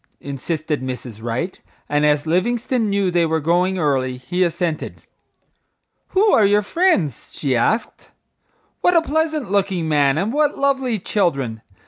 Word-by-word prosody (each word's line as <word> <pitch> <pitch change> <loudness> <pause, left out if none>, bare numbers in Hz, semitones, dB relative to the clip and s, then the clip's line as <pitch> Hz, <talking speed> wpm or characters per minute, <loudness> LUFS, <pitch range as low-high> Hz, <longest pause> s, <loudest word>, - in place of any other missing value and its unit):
insisted 150 +2 -3
Mrs. 125 -4 -6
Wright, 120 +11 -3 0.3
and 145 0 +1
as 150 0 +2
Livingstone 225 +7 0
knew 200 -2 +1
they 175 -1 +2
were 160 0 0
going 175 +4 +1
early 135 -6 0
he 175 +9 -1
assented. 170 -2 -3 1.0
"Who 410 +2 +3
are 220 - +5
your 205 +1 +3
friends?" 205 - 0
she 135 -4 0
asked. 220 - -1 0.7
"What 355 -1 +3
a 330 - +3
pleasant 310 - -1
looking 190 -4 0
man, 145 -2 +2
and 205 +7 -1
what 295 0 +1
lovely 270 -4 +1
children! 140 - -1
175 Hz, 140 wpm, -20 LUFS, 145-225 Hz, 1.0 s, are